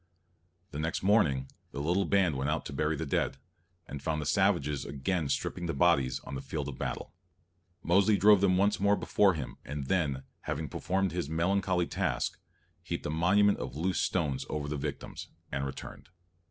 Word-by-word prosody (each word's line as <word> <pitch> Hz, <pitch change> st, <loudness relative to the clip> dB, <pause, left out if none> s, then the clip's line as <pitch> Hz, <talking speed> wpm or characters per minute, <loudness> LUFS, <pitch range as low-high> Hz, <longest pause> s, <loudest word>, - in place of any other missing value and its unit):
The 75 Hz, -, -5 dB
next 80 Hz, +3 st, -2 dB
morning, 80 Hz, -11 st, +3 dB, 0.3 s
the 70 Hz, -, -4 dB
little 85 Hz, +7 st, +1 dB
band 95 Hz, -6 st, +2 dB
went 70 Hz, +2 st, -1 dB
out 75 Hz, -, -1 dB
to 70 Hz, -, -6 dB
bury 75 Hz, +3 st, 0 dB
the 80 Hz, -, -3 dB
dead, 70 Hz, -, 0 dB, 0.5 s
and 70 Hz, 0 st, -6 dB
found 80 Hz, +2 st, -1 dB
the 75 Hz, -, -3 dB
savages 85 Hz, -6 st, +2 dB
again 70 Hz, +3 st, -2 dB
stripping 85 Hz, +5 st, -2 dB
the 85 Hz, -, -2 dB
bodies 70 Hz, -4 st, +3 dB
on -, -, -9 dB
the 65 Hz, -, -4 dB
field 70 Hz, +1 st, -4 dB
of 65 Hz, -, -8 dB
battle. -, -, -4 dB, 0.7 s
Mosely 100 Hz, +4 st, +4 dB
drove 100 Hz, +1 st, +6 dB
them 95 Hz, -2 st, +4 dB
once 100 Hz, +2 st, +2 dB
more 100 Hz, +1 st, +4 dB
before 100 Hz, -2 st, +3 dB
him, 75 Hz, -5 st, -6 dB
and 75 Hz, -1 st, -5 dB
then, 70 Hz, -5 st, 0 dB, 0.2 s
having -, -, -3 dB
performed 95 Hz, +1 st, -1 dB
his 85 Hz, -4 st, -3 dB
melancholy 90 Hz, +2 st, +1 dB
task, -, -, -2 dB, 0.4 s
heaped -, -, -4 dB
a -, -, -1 dB
monument 100 Hz, +6 st, +3 dB
of 65 Hz, +2 st, -5 dB
loose 90 Hz, +4 st, 0 dB
stones 75 Hz, -8 st, 0 dB
over 75 Hz, -1 st, -3 dB
the 75 Hz, -, -2 dB
victims, 70 Hz, 0 st, -5 dB, 0.2 s
and 70 Hz, 0 st, -1 dB
returned. 65 Hz, -, -9 dB
80 Hz, 180 wpm, -30 LUFS, 70-95 Hz, 0.7 s, drove